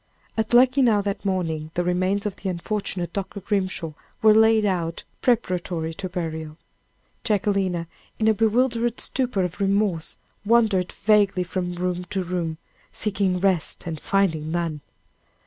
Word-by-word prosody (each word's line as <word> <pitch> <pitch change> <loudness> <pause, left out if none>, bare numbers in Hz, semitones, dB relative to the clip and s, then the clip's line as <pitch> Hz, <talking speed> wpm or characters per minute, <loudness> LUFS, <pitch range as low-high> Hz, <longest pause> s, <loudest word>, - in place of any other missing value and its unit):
At 220 -1 -1
Luckenough 245 -3 +5
that 200 0 -3
morning, 165 -5 -1
the 175 - +1
remains 185 +3 0
of 205 -2 -2
the 195 - -3
unfortunate 185 0 -3
Dr. 200 +1 -4
Grimshaw 190 -5 -2 0.3
were 215 -1 +8
laid 220 0 +5
out 170 -4 -1 0.2
preparatory 180 -8 0
to 185 +2 -5
burial. 160 -3 -4 0.7
Jacquelina, 195 -5 0 0.3
in 220 - +1
a 220 - +6
bewildered 235 +2 +1
stupor 250 -7 0
of 180 +1 -4
remorse, 195 -4 +1 0.3
wandered 210 -5 +3
vaguely 205 -4 +3
from 180 0 -3
room 180 0 -2
to 190 +1 -2
room, 170 -3 -3 0.3
seeking 195 -3 -1
rest 185 -4 0
and 160 -2 -4
finding 165 -6 +1
none. 165 -3 -2
190 Hz, 135 wpm, -24 LUFS, 175-210 Hz, 0.7 s, were